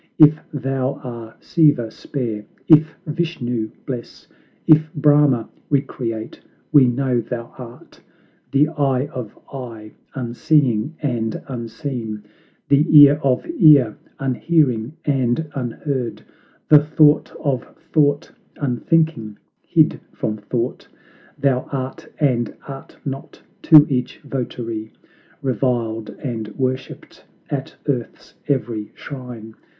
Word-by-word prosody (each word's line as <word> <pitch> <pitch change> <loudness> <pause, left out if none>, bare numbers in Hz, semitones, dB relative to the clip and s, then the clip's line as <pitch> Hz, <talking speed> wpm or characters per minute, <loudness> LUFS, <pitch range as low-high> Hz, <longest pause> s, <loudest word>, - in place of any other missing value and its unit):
If 150 0 +7
thou 135 -1 -1
are 115 -3 -8
Siva, 145 -9 +3
spare; 115 -5 -4 0.2
if 160 -1 +6
Vishnu, 135 -9 -2 0.2
bless; 125 -3 -7 0.4
If 155 0 +5
Brahma, 145 -5 +4 0.2
recreate; 120 -5 -2 0.3
we 145 -4 +7
know 125 -1 0
thou 115 0 -6
art 120 -1 -12 0.5
The 145 +2 +3
Eye 140 -4 0
of 120 -5 -7 0.2
eye, 115 -5 -8 0.2
unseeing 125 +1 +1
and 115 -5 -1
unseen; 115 -3 -5 0.4
The 140 +1 +4 0.2
Ear 145 0 +8
of 130 -2 +1
ear, 145 - +6 0.2
unhearing 135 -2 +1
and 135 +1 +1
unheard; 130 0 -3 0.4
The 150 - +8
Thought 150 0 +4
of 135 -4 -1 0.3
thought, 145 0 +2 0.3
unthinking, 130 -4 0 0.2
hid - - +2
from 110 0 -3
thought. 115 +4 -3 0.5
Thou 130 -2 +1
art, 130 -1 -5
and 125 -6 +1 0.2
art 135 -1 -10
not 135 -1 -6 0.2
to 155 -3 +8
each 130 -5 -2
votary; 115 -5 -5 0.5
Reviled 115 -3 -1
and 115 -5 -3
worshiped 130 -1 -4 0.3
at - - -4
earth's - - -3
every 120 -7 -2
shrine! 125 -5 -9
130 Hz, 105 wpm, -20 LUFS, 115-145 Hz, 0.5 s, Ear